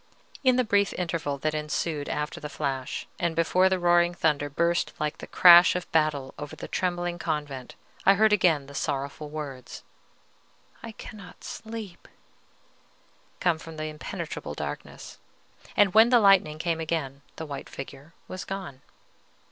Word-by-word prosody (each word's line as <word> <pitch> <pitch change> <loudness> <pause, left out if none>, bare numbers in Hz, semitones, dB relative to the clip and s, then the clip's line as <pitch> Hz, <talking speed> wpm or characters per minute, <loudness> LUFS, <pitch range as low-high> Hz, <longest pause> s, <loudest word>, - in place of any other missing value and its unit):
In 255 -2 +5
the 255 - +3
brief 200 -3 +2
interval 160 -5 -2
that 155 +2 -1
ensued 150 0 -2
after 150 0 -3
the 150 - -6
flash, 135 -4 -3
and 170 -1 0
before 180 +3 +3
the 190 - +1
roaring 175 0 +3
thunder 150 -4 +1
burst 170 +4 +1
like 150 -1 -2
the - - -8
crash 175 0 +8
of 180 - -4
battle 150 -4 +1
over 145 0 -7
the - - -8
trembling 175 -1 -2
convent, 145 -6 -4 0.3
I 195 - +6
heard 215 +1 +4
again 170 -8 +3
the 140 - -12
sorrowful 140 +2 -3
words, 145 -4 -7 1.0
"I 230 - -8
cannot 210 -3 -11
sleep," 220 -5 -8 1.3
come 170 -3 +1
from 160 0 -10
the 155 - -4
impenetrable 150 0 -6
darkness. - - -7 0.6
And 205 -3 +5
when 220 +2 +7
the 245 -1 +6
lightning 195 -7 +4
came 165 0 -1
again, 155 -4 -3
the 160 - -6
white 140 -2 -7
figure 140 +3 -10
was 185 - -6
gone. 185 -9 -7
165 Hz, 150 wpm, -27 LUFS, 145-185 Hz, 1.3 s, crash